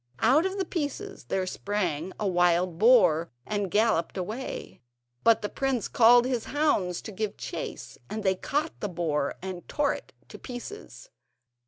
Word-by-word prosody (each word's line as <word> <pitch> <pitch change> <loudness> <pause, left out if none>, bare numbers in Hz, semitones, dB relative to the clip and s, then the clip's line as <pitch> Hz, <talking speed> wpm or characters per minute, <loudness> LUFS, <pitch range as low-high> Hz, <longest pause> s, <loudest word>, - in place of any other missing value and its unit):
Out 285 +10 +5
of 380 +1 -5
the 385 - 0
pieces 345 +6 -4
there 190 -1 -1
sprang 185 -4 -2
a 210 - 0
wild 175 -1 +2
boar 180 -9 +5 0.2
and 205 -2 -2
galloped 210 -3 +1
away, 215 +8 -5 0.4
but 230 -2 +4
the - - 0
prince 265 -1 -1
called 240 +1 +6
his 250 -3 -1
hounds 240 - 0
to 220 - -7
give 215 +1 -3
chase, - - -6
and 215 -1 -4
they 190 -1 +3
caught 295 - -2
the 205 - -3
boar 160 -5 -1
and 185 -2 -6
tore 295 -1 +1
it - - -9 0.2
to - - -10
bits. 410 - -9
215 Hz, 160 wpm, -27 LUFS, 180-260 Hz, 0.4 s, called